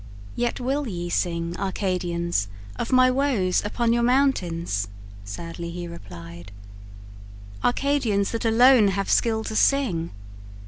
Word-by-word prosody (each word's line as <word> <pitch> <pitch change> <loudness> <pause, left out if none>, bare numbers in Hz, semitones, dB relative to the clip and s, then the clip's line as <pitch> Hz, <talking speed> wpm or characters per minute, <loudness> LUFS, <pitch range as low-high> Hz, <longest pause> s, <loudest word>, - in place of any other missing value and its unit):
"Yet 240 0 -1
will 270 +3 -1
ye 175 -4 -4
sing, 170 -1 -1
Arcadians, 175 - -1 0.3
of - - -4
my 255 0 +5
woes 255 -9 +1
Upon 230 +3 0
your 235 - +2
mountains," 180 - +1 0.4
sadly 165 +11 -6
he 175 0 -6
replied 85 - -10 1.1
"Arcadians, 245 -7 +1
that 230 - -3
alone 235 0 +6
have 195 0 -1
skill 220 -1 +2
to 220 - -5
sing. 215 -13 +2
195 Hz, 120 wpm, -24 LUFS, 170-245 Hz, 1.1 s, alone